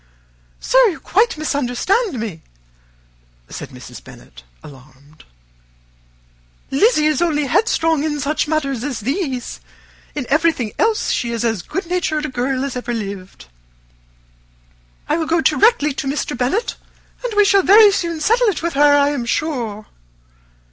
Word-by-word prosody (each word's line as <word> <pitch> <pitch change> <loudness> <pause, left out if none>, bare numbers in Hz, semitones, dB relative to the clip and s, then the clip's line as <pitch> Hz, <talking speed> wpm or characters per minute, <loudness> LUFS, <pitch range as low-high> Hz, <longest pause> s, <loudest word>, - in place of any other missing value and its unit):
"Sir, - - +2
you 355 -6 -3
quite 440 -1 +1
misunderstand 300 - -1
me," 200 -8 -5 1.1
said - - -8
Mrs. - - -12
Bennet, - - -15 0.2
alarmed. 140 +2 -16 1.5
"Lizzy 305 - +3
is 305 -1 +1
only 300 -4 +1
headstrong 325 - +1
in 300 -1 -2
such 295 +3 -1
matters 275 -6 -1
as 260 -5 -4
these. 265 - -3 0.6
In 290 -4 -3
everything 305 -6 +1
else 445 0 +1
she 235 - -1
is 235 0 -2
as 225 -5 0
good 380 - -5
natured 335 -3 -1
a - - -4
girl 255 +1 -2
as 275 - -5
ever 240 -1 -3
lived. 195 - -7 1.6
I - - +1
will 320 -2 -2
go 335 +1 +2
directly 300 - +3
to 275 - -4
Mr. 280 -1 -2
Bennet, 260 - -1 0.5
and 480 -4 -3
we 415 - +6
shall 395 0 +4
very 410 +3 +7
soon 340 -4 -2
settle 460 +8 +2
it 395 -5 -1
with 340 - -1
her, 290 +1 +5
I 285 0 +3
am 260 -5 -3
sure." 235 -8 -2
295 Hz, 145 wpm, -19 LUFS, 245-345 Hz, 1.6 s, very